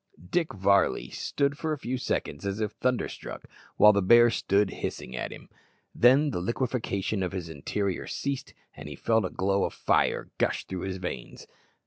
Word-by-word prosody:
Dick 170 -3 +1
Varley 95 -10 +2
stood 140 0 -1
for 160 -1 -1
a - - -3
few 130 -1 -3
seconds 75 - -2
as 100 +1 -2
if 105 -1 -1
thunderstruck, 125 +1 -3 0.3
while 105 0 +8
the 100 - +2
bear 120 +5 +6
stood 100 -2 +1
hissing 65 - -4
at - - -4
him. - - -11 0.5
Then 140 +5 +5
the 90 - -2
liquefaction 110 -2 -1
of 90 0 -2
his 90 -3 -4
interior 90 +6 -3
ceased, 140 -1 -4 0.2
and 75 0 -9
he 75 - -7
felt 110 - +1
a - - -2
glow 95 +1 0
of - - -2
fire - - +1
gush - - 0
through 95 0 -5
his 95 -1 -3
veins. 90 -9 -6
100 Hz, 175 wpm, -28 LUFS, 95-125 Hz, 0.5 s, while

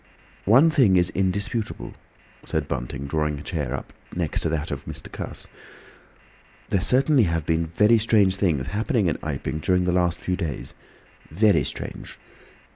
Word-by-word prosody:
"One 135 - +6
thing 125 -11 +4
is 90 0 +3
indisputable," 100 - -1 0.5
said - - -2
Bunting, 65 +3 -4
drawing 75 +1 -1
up - - -7
a - - -10
chair 70 -6 -3 0.3
next 85 -4 -1
to - - 0
that 80 0 -2
of - - -4 0.3
Cuss. - - -6 1.2
"There 95 - +1
certainly 130 - +4
have 80 -3 -1
been 80 0 0
very 105 +7 +4
strange 105 -4 +3
things 80 -10 +1
happen 110 - -2
in 80 - 0
Iping 75 0 -3
during 90 +3 +2
the 90 - +1
last 90 -1 +1
few 90 - -1
days—very 85 +3 -2
strange. - - -7
90 Hz, 145 wpm, -24 LUFS, 75-105 Hz, 1.2 s, One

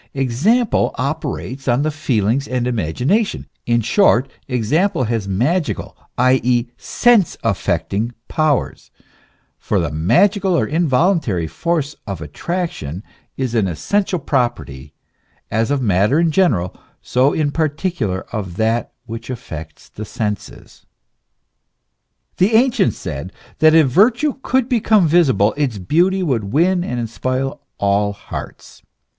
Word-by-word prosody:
Example 160 - +1
operates 140 -1 -4
on 125 +3 +2
the 155 - 0
feelings 130 -3 0
and 125 -1 -1
imagination. 125 - 0 0.2
In 120 0 +2
short, 130 - +3 0.2
example 130 - +1
has 115 -3 -2
magical, 140 - -1 0.2
i. 130 +1 +4
e., 120 0 +1
sense 200 - +2
affecting 100 +1 -1 0.2
powers; 155 -3 -1 0.7
for - - 0
the 80 -3 -1
ma 85 - +3
gical 200 -2 0
or - - +2
involuntary 155 - +1
force 150 - -2
of 95 -4 -4
attraction, 90 - -4 0.3
is 130 -3 -2
an 110 -5 +2
essential 185 - -1
property 120 - -2 0.6
as 110 +2 +1
of 140 -2 0
matter 105 - +2
in 165 -1 +2
general, 120 - +1 0.3
so 130 +3 +2
in 150 -2 0
particular 150 - -1
of 95 -6 -4
that 115 +1 0
which 115 +1 -8
affects 80 - -8
the 105 - -8
senses. 105 -2 -6 1.5
The 205 +5 +3
ancients 245 +2 +3
said, - - -6 0.3
that 155 0 +6
if 160 -2 +6
virtue 240 - +2
could 260 -2 +1
become 215 -7 +3
visible, 130 - +3
its 135 -7 -1
beauty 175 - +1
would 125 - 0
win 175 +5 +2
and 125 -7 -3
inspire 130 +3 -2 0.3
all 100 0 +1
hearts. 100 - -9
130 Hz, 125 wpm, -19 LUFS, 105-170 Hz, 1.5 s, that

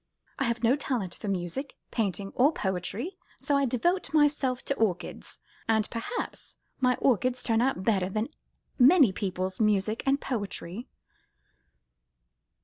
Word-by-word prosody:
"I 270 - +1
have 235 0 -1
no 235 +3 +5
talent 245 -10 -2
for - - -8
music, 195 - -3 0.2
painting, 200 -3 -1
or 275 +5 +4
poetry, 205 - -3 0.2
so 285 - 0
I 280 0 +3
devote 345 +10 +1
myself 285 -4 +2
to - - +1
orchids; 205 -9 -2 0.3
and 220 -1 +2
perhaps 230 - -5 0.2
my 250 -1 +3
orchids 255 0 +1
turn 225 -1 +2
out 250 -7 0
better 190 -3 +2
than 215 +5 -2 0.5
many 270 - +7
people's 185 -1 -3
music 215 0 +2
and 275 +1 +3
poetry." 210 -3 -4
230 Hz, 135 wpm, -28 LUFS, 195-270 Hz, 0.5 s, many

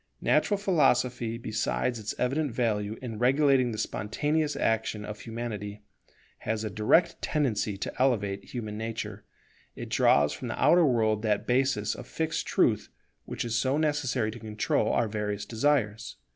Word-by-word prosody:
Natural 205 - +2
philosophy, 125 - +1
besides 115 +1 -1
its 105 - -4
evident 140 +3 0
value 110 -3 -1
in 115 -4 -5
regulating 135 0 +3
the 110 - -5
spontaneous 150 +10 -1
action 110 -1 -1
of 105 0 -7
Humanity, 105 -3 -6 0.6
has 110 0 -2
a 110 - -3
direct 165 - +2
tendency 110 -9 0
to - - -4
elevate 100 -7 +1
human 110 -4 -6
nature; 110 -2 -5 0.5
it - - -7
draws 75 +1 +4
from 75 - -6
the - - -4
outer 175 -2 +5
world 110 -4 +2
that 105 -2 0
basis 125 -4 +1
of - - -9
fixed 160 0 -2
truth - - +2 0.4
which - - -4
is 115 -1 -2
so 130 +4 +1
necessary 135 -7 0
to 120 - -9
control 105 -1 0
our 115 - +1
various 105 -1 -3
desires. 110 -2 0
115 Hz, 150 wpm, -28 LUFS, 105-135 Hz, 0.6 s, outer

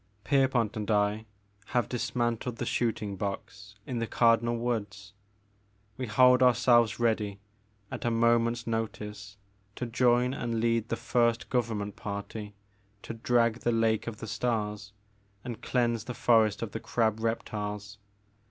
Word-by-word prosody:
Pierpont 130 -5 +2
and 105 -1 -4
I 105 +1 +1 0.5
have 120 - +2
dismantled 120 0 -2
the - - -4
shooting 110 -4 -1
box 100 +1 -6
in 125 -2 -3
the 115 - -2
Cardinal 115 0 +3
Woods. 100 -5 -3 0.8
We 130 -1 -4
hold 125 +4 +5
ourselves 120 -2 +4
ready 110 -4 0 0.5
at - - -5
a 120 - +1
moment's 115 +1 +2
notice 105 -3 -4 0.4
to 125 - -3
join 120 +1 +2
and 115 -4 -2
lead 115 0 +1
the - - 0
first 115 0 0
Government 110 -5 -1
party 105 0 -6 0.5
to - - -6
drag 115 0 +1
the 120 - 0
Lake 115 -1 +1
of 115 -2 -5
the - - -7
Stars 105 -3 -2 0.5
and 120 -2 -6
cleanse 120 -3 0
the 125 - -6
forest 110 -3 +3
of 115 - -5
the 110 - -4
crab 110 -2 0
reptiles. 105 -2 -4
115 Hz, 140 wpm, -29 LUFS, 105-120 Hz, 0.8 s, hold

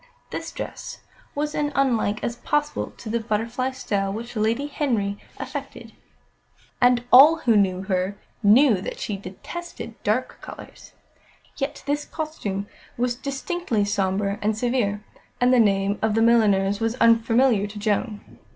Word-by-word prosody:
This - - -5
dress - - -7 0.3
was 295 +1 -2
as 295 -1 -1
unlike 235 -6 +1
as 235 - -2
possible 295 +3 -1
to - - -10
the 230 +2 0
butterfly 230 +3 -1
style 200 -6 -2
which 235 +4 -6
Lady 225 +6 0
Henry 230 -9 -1 0.2
affected, - - -7 0.9
and 245 -1 +4
all 290 +6 +9
who 245 -8 +2
knew 190 -2 +2
her 190 +1 -1 0.2
knew 220 -1 +5
that - - -5
she 210 - -3
detested 225 - -8
dark 235 +5 -1
colours. - - -11 0.6
Yet 280 0 -4
this 290 +1 -1
costume 260 - -4 0.3
was 245 0 +1
distinctly 270 - -2
sombre 200 0 -1
and 215 +1 0
severe; 220 -4 0 0.4
and 250 +1 +4
the 250 - +5
name 200 -2 +2
of 220 -1 +1
the 225 - +3
milliner 215 -4 +4
was 225 +1 -1
unfamiliar 230 -2 +3
to 210 +1 -10
Joan. 210 +1 -3
225 Hz, 140 wpm, -24 LUFS, 205-260 Hz, 0.9 s, all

